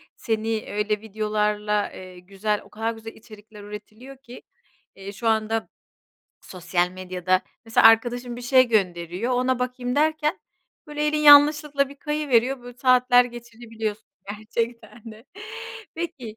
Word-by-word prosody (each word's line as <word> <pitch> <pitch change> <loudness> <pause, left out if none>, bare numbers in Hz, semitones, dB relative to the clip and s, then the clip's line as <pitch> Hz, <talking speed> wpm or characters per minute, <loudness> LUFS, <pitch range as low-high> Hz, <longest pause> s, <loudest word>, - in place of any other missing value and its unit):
Seni 225 -1 -2
öyle 210 0 -1
videolarla, 210 -1 -1
eee, 185 -1 -11
güzel, 200 +3 -3
o - - -19
kadar 225 +2 -3
güzel 225 0 -10
içerikler 210 -1 -15
üretiliyor 215 +6 -11
ki, 255 -2 -13 0.5
eee, 195 +1 -8
şu 225 +3 -5
anda 220 0 0 0.7
sosyal 180 -1 -2
medyada. 185 0 -1 0.2
Mesela 225 0 +5
arkadaşım 240 +2 +2
bir 245 - -9
şey 255 0 +4
gönderiyor. 185 +1 -1
Ona 255 0 +1
bakayım 250 0 -3
derken 310 +2 +1 0.5
böyle, 300 0 -2
elin 300 0 +1
yanlışlıkla 290 -1 +6
bir 280 - -13
kayıveriyor 270 -4 0
böyle, 245 0 -11
saatler 250 -1 +5
geçirebiliyorsun 230 -3 -7 0.2
gerçekten 225 +1 -5
de. 220 +3 -16 0.7
Peki 290 -10 -6
225 Hz, 130 wpm, -24 LUFS, 210-255 Hz, 0.7 s, yanlışlıkla